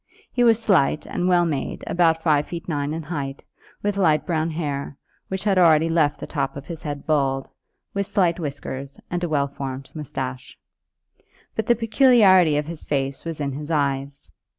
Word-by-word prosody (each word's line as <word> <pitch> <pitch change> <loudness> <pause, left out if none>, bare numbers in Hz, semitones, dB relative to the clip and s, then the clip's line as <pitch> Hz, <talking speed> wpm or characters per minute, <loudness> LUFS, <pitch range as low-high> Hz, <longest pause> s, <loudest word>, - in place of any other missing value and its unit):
He 245 - +1
was 230 -2 +5
slight 175 -10 +2
and 180 - -2
well 175 -1 +4
made, 145 -5 -3
about 165 -2 +2
five 150 -3 +2
feet 170 0 -7
nine 145 -3 -1
in 160 +1 -4
height, 140 -3 -5 0.4
with 205 -1 0
light 160 -6 +3
brown 160 -2 0
hair, 145 -4 -4 0.3
which 190 0 -4
had 195 -3 +3
already 165 -2 +5
left 160 -3 +2
the - - -5
top 140 -2 -3
of 140 - -8
his 165 0 -7
head 145 -2 -5
bald, 135 -3 +1 0.5
with 200 0 -1
slight 180 -4 +1
whiskers, 140 -2 -6
and 175 0 -2
a 175 - -1
well 140 -2 +1
formed 135 -1 -6
moustache. 130 -4 -6 1.0
But 220 - -2
the 240 - +5
peculiarity 220 - +5
of 150 - -1
his 165 0 -7
face 135 -1 -2
was 165 -2 -4
in 140 -1 -1
his 145 +3 -6
eyes. 140 -2 -2
155 Hz, 180 wpm, -23 LUFS, 140-175 Hz, 1.0 s, was